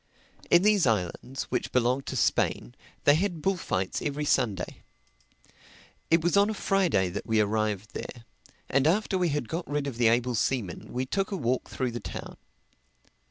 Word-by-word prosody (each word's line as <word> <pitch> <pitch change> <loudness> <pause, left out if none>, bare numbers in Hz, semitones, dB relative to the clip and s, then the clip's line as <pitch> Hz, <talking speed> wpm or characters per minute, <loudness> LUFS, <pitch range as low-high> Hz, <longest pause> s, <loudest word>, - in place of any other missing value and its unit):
In 175 +1 +6
these 205 -7 +4
islands, 115 +5 -1
which - - -1
belonged 125 +2 +1
to - - -3
Spain, - - +1 0.3
they 145 - +6
had 175 +1 0
bullfights 165 - -1
every 150 0 -2
Sunday. 110 -11 0 1.3
It 165 0 +4
was 175 +2 +2
on 200 +1 +5
a 220 - -2
Friday 180 - +2
that 90 - -6
we 110 -1 +2
arrived 105 -1 0
there; 120 -2 -7 0.4
and 140 +2 +2
after 195 +3 +1
we 180 -2 +2
had 145 -5 -2
got 170 +6 -4
rid 145 -1 -1
of 135 -5 -5
the 120 -1 +4
able 120 +2 +2
seaman 110 -3 -1
we 125 +1 -2
took 195 +8 -1
a 200 - -3
walk 125 -4 -1
through 130 -2 -2
the 120 - -4
town. - - -7
130 Hz, 170 wpm, -28 LUFS, 115-170 Hz, 1.3 s, In